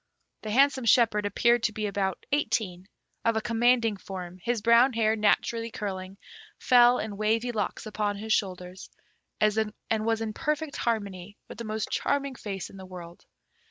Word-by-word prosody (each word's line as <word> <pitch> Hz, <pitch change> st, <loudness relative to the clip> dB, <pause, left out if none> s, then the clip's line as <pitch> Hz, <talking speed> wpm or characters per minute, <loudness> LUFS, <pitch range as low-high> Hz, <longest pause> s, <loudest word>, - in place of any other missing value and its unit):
The 215 Hz, -, -6 dB
handsome 265 Hz, +2 st, +3 dB
shepherd 220 Hz, -2 st, +4 dB
appeared 235 Hz, +4 st, +3 dB
to 220 Hz, -, +1 dB
be 215 Hz, 0 st, -3 dB
about 195 Hz, -2 st, -2 dB
eighteen, 195 Hz, -10 st, -1 dB, 0.4 s
of 230 Hz, -1 st, +2 dB
a -, -, +2 dB
commanding 230 Hz, -1 st, +2 dB
form; 185 Hz, -2 st, -8 dB
his 240 Hz, +4 st, -1 dB
brown 235 Hz, +3 st, +5 dB
hair, 220 Hz, -1 st, +2 dB
naturally 230 Hz, +2 st, +1 dB
curling, 195 Hz, -3 st, -5 dB, 0.4 s
fell 245 Hz, 0 st, +5 dB
in 210 Hz, -4 st, -4 dB
wavy 225 Hz, +3 st, +1 dB
locks 220 Hz, -, -3 dB
upon 210 Hz, -1 st, -2 dB
his 220 Hz, +1 st, -1 dB
shoulders, 185 Hz, -2 st, -3 dB, 0.5 s
and 215 Hz, +1 st, +2 dB, 0.2 s
was 225 Hz, 0 st, +1 dB
in 220 Hz, -1 st, -3 dB
perfect 305 Hz, +2 st, -2 dB
harmony 205 Hz, -4 st, -3 dB
with -, -, -11 dB
the 235 Hz, -, -5 dB
most 215 Hz, 0 st, -3 dB
charming 280 Hz, -1 st, 0 dB
face 200 Hz, -6 st, -6 dB
in 195 Hz, -, -12 dB
the 190 Hz, -, -9 dB
world. 175 Hz, -2 st, -11 dB
220 Hz, 160 wpm, -27 LUFS, 200-235 Hz, 0.5 s, brown